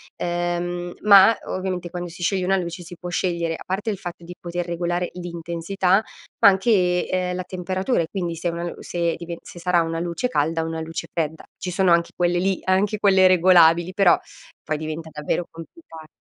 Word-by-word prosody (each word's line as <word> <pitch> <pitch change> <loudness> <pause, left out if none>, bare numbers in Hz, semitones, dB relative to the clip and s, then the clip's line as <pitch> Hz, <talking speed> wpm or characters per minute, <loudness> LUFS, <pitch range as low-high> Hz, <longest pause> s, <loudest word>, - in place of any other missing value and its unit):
ehm, 175 0 -2
ma 200 +1 +7
ovviamente 185 -2 -3
quando 175 -1 -5
si 175 +1 -9
scioglie 190 +1 +1
una 195 +1 +2
luce, 170 0 -4
si 175 +1 -10
può 180 - -8
scegliere, 170 -2 -1
a - - -8
parte 200 +4 -2
il 200 - -5
fatto 175 -3 -8
di 175 +1 -9
poter 175 0 -4
regolare 175 +1 -2
l'intensità, 175 +3 -1 0.4
ma - - +7
anche, 190 -3 +3
ehm, 180 -1 -1
la 185 - -3
temperatura 185 +5 -2
e 165 - -3
quindi 175 -4 -3
se 170 +2 -3
una 170 0 -4
se 170 -1 -1
dive 170 0 -7
se 175 - -11
sarà 175 -1 +2
una 165 0 -3
luce 170 +7 -2
calda 165 -7 0
o - - -4
una 160 0 -4
luce 165 0 -5
fredda. 160 -1 -2
Ci 185 - -5
sono 185 0 +2
anche 170 0 +3
quelle 175 0 +1
lì, 190 +1 0
anche 195 +3 +1
quelle 190 -2 +5
regolabili, 175 -1 +5
però 185 -3 +5 0.5
poi 155 - -2
diventa 155 +1 -6
davvero 150 +3 -2
complica 165 - -12
175 Hz, 190 wpm, -23 LUFS, 170-185 Hz, 0.5 s, ma